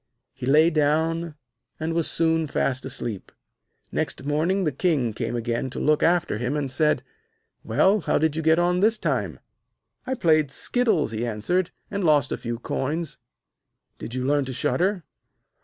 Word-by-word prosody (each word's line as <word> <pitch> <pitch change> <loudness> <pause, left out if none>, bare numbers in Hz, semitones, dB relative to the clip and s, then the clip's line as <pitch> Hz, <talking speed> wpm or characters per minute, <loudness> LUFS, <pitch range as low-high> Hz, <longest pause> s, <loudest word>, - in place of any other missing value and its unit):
He 125 - -6
lay 155 +4 +5
down, 160 +2 +1 0.4
and 160 +1 -2
was 165 -1 +1
soon 160 -1 +1
fast 130 -2 -1
asleep. 120 -6 -5 0.6
Next 130 - -3
morning 165 +7 +1
the 155 - +1
King 135 - 0
came 115 +1 -3
again 120 +2 -2
to - - -5
look 150 0 +2
after 170 -9 +2
him, 125 +5 -1
and 140 -3 -2
said: 150 +3 +1 0.6
'Well, 200 +3 +3
how - - +1
did 155 -1 +1
you 160 - -1
get 160 +1 +4
on 175 +1 +2
this 220 +4 +3
time?' - - -2 0.7
'I 260 - 0
played 155 - +3
skittles,' 215 - 0
he 110 +1 -3
answered, 120 - 0 0.2
'and 200 -1 -2
lost 150 -4 +3
a - - -1
few 120 0 -4
coins.' 150 +6 -3 0.8
'Didn't 120 - -6
you 130 0 -2
learn 145 0 +2
to 130 - -5
shudder?' 180 +8 0
155 Hz, 165 wpm, -24 LUFS, 130-170 Hz, 0.8 s, lay